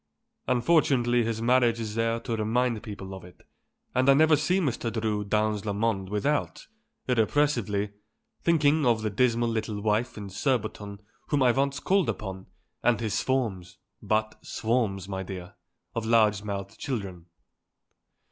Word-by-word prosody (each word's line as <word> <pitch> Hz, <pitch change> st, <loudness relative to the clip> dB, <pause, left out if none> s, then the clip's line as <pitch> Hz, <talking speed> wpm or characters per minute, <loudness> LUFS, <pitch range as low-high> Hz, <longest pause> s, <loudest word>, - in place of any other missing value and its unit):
Unfortunately 125 Hz, -3 st, +3 dB
his 115 Hz, 0 st, -2 dB
marriage 120 Hz, -1 st, +3 dB
is 110 Hz, -2 st, -4 dB
there 115 Hz, +1 st, 0 dB
to 115 Hz, -1 st, -3 dB
remind 115 Hz, +1 st, 0 dB
people 100 Hz, -4 st, -8 dB
of 95 Hz, -, -9 dB
it, 90 Hz, 0 st, -15 dB, 0.5 s
and 130 Hz, +2 st, +3 dB
I 135 Hz, -, +7 dB
never 155 Hz, +2 st, +5 dB
see 180 Hz, +6 st, +1 dB
Mr. 125 Hz, -8 st, -1 dB
Drew 110 Hz, -2 st, -1 dB
dans 105 Hz, 0 st, 0 dB
le 105 Hz, -2 st, -2 dB
monde 100 Hz, -3 st, -1 dB
without, 140 Hz, +9 st, -1 dB, 0.4 s
irrepressibly, 115 Hz, -4 st, +1 dB, 0.5 s
thinking 155 Hz, -2 st, +3 dB
of 115 Hz, -4 st, +2 dB
the 110 Hz, -, -1 dB
dismal 120 Hz, +1 st, +2 dB
little 110 Hz, -2 st, -2 dB
wife 110 Hz, +4 st, 0 dB
in 100 Hz, -2 st, -7 dB
Surbiton 105 Hz, -3 st, -2 dB, 0.2 s
whom 145 Hz, -3 st, +2 dB
I 125 Hz, -, +5 dB
once 140 Hz, +2 st, 0 dB
called 190 Hz, +3 st, +2 dB
upon, 95 Hz, -2 st, -5 dB, 0.3 s
and 120 Hz, -3 st, +2 dB
his 110 Hz, -3 st, -2 dB
swarms 110 Hz, -8 st, -1 dB, 0.2 s
but 110 Hz, 0 st, -1 dB
swarms, 110 Hz, -5 st, -1 dB
my 95 Hz, -1 st, -4 dB
dear 90 Hz, -2 st, -7 dB, 0.4 s
of 115 Hz, -1 st, -3 dB
large 110 Hz, -3 st, +4 dB
mouthed 100 Hz, -1 st, -5 dB
children." 100 Hz, -, -5 dB
115 Hz, 145 wpm, -27 LUFS, 105-125 Hz, 0.5 s, I